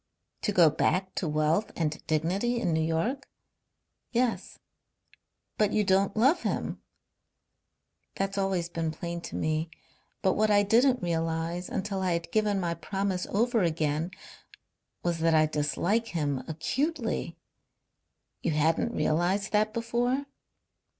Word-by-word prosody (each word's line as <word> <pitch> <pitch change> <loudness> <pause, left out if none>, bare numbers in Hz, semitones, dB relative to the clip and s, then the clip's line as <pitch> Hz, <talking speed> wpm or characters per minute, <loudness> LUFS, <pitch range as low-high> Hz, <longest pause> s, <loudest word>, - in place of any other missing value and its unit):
"To 210 - 0
go 170 -6 +6
back 185 +5 0
to 175 - -2
wealth 155 +7 +1
and 155 -2 -2
dignity 185 +10 0
in 175 -8 0
New 160 - +2
York?" 165 - -1 0.8
"Yes." 245 -1 -1 1.0
"But 210 -1 +3
you 210 - +3
don't 195 +1 +2
love 275 +10 +4
him?" - - -2 1.3
"That's 195 0 -2
always 195 -3 0
been 165 -1 -2
plain 170 +2 -5
to - - -7
me. 155 +1 -1 0.5
But 190 - +4
what 215 +1 +2
I 205 -1 +5
didn't 245 +3 +3
realize, 165 +1 -1
until 195 0 -2
I 185 -2 +1
had 170 0 -3
given 210 -2 +2
my 170 -2 -1
promise 190 +2 -2
over 230 +2 +2
again, 155 -1 0 0.9
was 170 -1 0
that 165 0 +3
I 155 0 +5
dislike 155 +9 0
him 145 - -2
acutely." 270 - -2 1.0
"You - - 0
hadn't 160 +10 +1
realized 180 +6 +1
that 215 0 +2
before?" 240 +4 0
185 Hz, 130 wpm, -28 LUFS, 160-215 Hz, 1.3 s, go